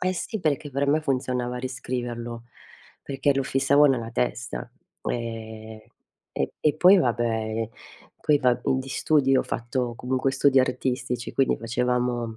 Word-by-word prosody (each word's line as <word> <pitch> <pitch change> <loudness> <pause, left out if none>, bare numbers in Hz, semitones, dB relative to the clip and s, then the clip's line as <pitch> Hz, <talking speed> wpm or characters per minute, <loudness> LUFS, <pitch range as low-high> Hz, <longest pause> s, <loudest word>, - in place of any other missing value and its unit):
eh, 185 0 +1
sì, 220 +4 -4
perché 145 -2 -1
per 140 +2 0
me 150 +2 +3
funzionava 125 -3 -1
riscriverlo, 120 -2 -5 0.6
perché 135 +1 0
lo 135 - +1
fissavo 135 +2 +3
nella 120 -5 0
testa, 120 0 -3 0.3
ehm, 110 -1 -5 0.5
e 70 - -2
e 150 - +2
poi 180 +5 +7
vabbè, 115 -4 0 0.5
poi 150 -1 +4
va 125 -3 +2
di 130 0 0
studi 135 -1 +2
ho - - +3
fatto, 120 +1 -2
comunque 130 +2 0
studi 135 0 +4
artistici, 125 -1 -2
quindi 135 - +2
facevamo 120 0 -1
125 Hz, 135 wpm, -25 LUFS, 120-135 Hz, 0.6 s, poi